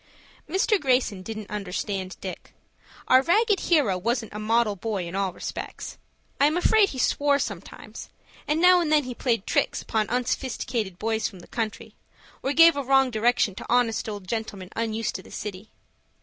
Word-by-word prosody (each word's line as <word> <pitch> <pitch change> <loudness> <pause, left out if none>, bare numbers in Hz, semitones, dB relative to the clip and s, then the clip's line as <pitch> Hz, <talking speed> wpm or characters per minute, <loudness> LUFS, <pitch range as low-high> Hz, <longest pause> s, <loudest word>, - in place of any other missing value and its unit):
Mr. 385 +4 +2
Greyson 250 -8 +1
didn't 215 +1 -7
understand 195 -1 -4
Dick. 185 -2 -8 0.5
Our 260 - +6
ragged 415 - +3
hero 265 - +2
wasn't 230 +2 -2
a 210 - -5
model 220 0 +1
boy 200 -2 -3
in 170 - -8
all 195 -1 0
respects. - - -7 0.4
I 285 - +6
am 310 +3 0
afraid 400 +3 +4
he 265 - -7
swore 285 +2 +2
sometimes, - - -7 0.4
and 300 +2 +1
now 360 +1 +6
and 315 -3 -1
then 300 -1 +4
he 250 -1 -5
played 230 -4 -1
tricks - - 0
upon 215 -2 -1
unsophisticated 240 -5 -2
boys 220 +1 -1
from 185 -3 -11
the - - -15
country, 225 -2 -4 0.5
or 270 - -1
gave 330 +2 +7
a 285 - -1
wrong 270 0 +3
direction 230 -2 +2
to - - -9
honest 235 -2 +1
old 205 -3 -7
gentlemen 205 -4 -4
unused 225 -1 -2
to - - -5
the - - -16
city. 205 0 -7
230 Hz, 175 wpm, -25 LUFS, 205-275 Hz, 0.5 s, gave